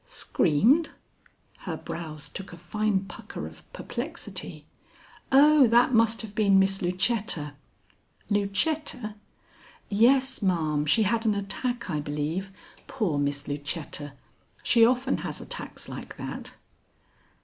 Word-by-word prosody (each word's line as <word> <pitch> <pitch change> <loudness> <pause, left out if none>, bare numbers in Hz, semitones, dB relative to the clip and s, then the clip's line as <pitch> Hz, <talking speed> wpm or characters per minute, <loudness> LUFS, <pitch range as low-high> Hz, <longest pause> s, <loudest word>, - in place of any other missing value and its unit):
"Screamed?" 260 - +2 0.7
Her - - -5
brows 155 -3 -6
took 195 - -7
a 175 - -10
fine 205 +3 0
pucker 185 - -8
of - - -13
perplexity. - - -5 0.7
"Oh, 285 0 +7
that 240 +3 +4
must 225 0 +3
have 210 -2 -8
been 200 -2 +4
Miss 195 0 +3
Lucetta." 180 -4 -1 0.7
"Lucetta?" 215 +3 0 0.8
"Yes, 260 +5 +3
ma'am; 155 -6 +1
she 220 +9 +4
had 225 +3 +1
an 210 - +3
attack, 235 +5 -2
I 155 -5 -1
believe. 150 +6 -3 0.4
Poor 190 - -1
Miss 145 0 -1
Lucetta! 145 0 -4 0.5
She 230 - +5
often 255 +3 +3
has - - -5
attacks - - -5
like - - -8
that." - - -7
200 Hz, 115 wpm, -27 LUFS, 165-235 Hz, 0.8 s, Oh